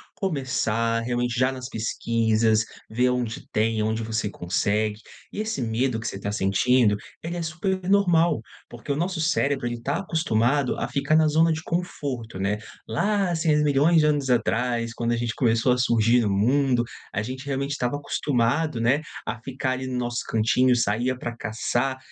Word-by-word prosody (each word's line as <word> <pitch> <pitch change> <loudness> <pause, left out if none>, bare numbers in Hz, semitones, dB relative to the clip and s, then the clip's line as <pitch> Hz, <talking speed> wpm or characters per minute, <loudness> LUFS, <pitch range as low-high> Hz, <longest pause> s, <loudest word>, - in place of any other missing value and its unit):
começar 125 - 0
realmente 120 +1 -1
já 130 +1 +3
nas 130 -1 -6
pesquisas, 110 -2 +1 0.3
ver 125 +3 +2
onde 125 -3 -2
tem, 110 0 +1
onde 110 +1 -1
você 110 -1 -2
consegue. 105 +4 -1 0.3
E 210 - -3
esse 215 -10 -3
medo 115 +1 0
que 110 - -5
você - - -4
tá 100 +1 -4
sentindo, 105 +3 +3 0.3
ele 170 +2 -4
é 175 - -3
super 170 +4 -2
normal, 175 - +3 0.3
porque 120 +4 -4
o - - -3
nosso 175 +4 -2
cérebro 140 -5 +1
ele 120 -1 -4
tá 140 +4 -1
acostumado 140 - +1
a - - -1
ficar 140 +3 +1
na 155 -1 +4
zona 160 +2 +3
de 160 0 -2
conforto, 135 - -4
né. 100 +2 0 0.3
Lá 195 - +1
há 170 - 0
6.000.000 150 0 +3
de 150 - +3
anos 145 -3 +1
atrás 120 -1 0
quando 120 0 -1
a 120 - +1
gente 115 0 -2
começou 115 0 +2
a 125 - 0
surgir 120 -1 +3
no 105 - 0
mundo, 125 +5 +2 0.3
a 105 - 0
gente 130 +5 -6
realmente 140 0 -2
estava 145 -1 -1
acostumado, 140 0 0
né, 125 +6 +2 0.3
a - - -2
ficar 130 +1 -2
ali 130 0 -3
no 130 -1 -3
nosso 120 -1 -2
cantinho, 120 +3 +3
saía 120 +3 +1
pra 120 -1 -5
caçar 120 +4 -1
125 Hz, 175 wpm, -25 LUFS, 115-145 Hz, 0.3 s, na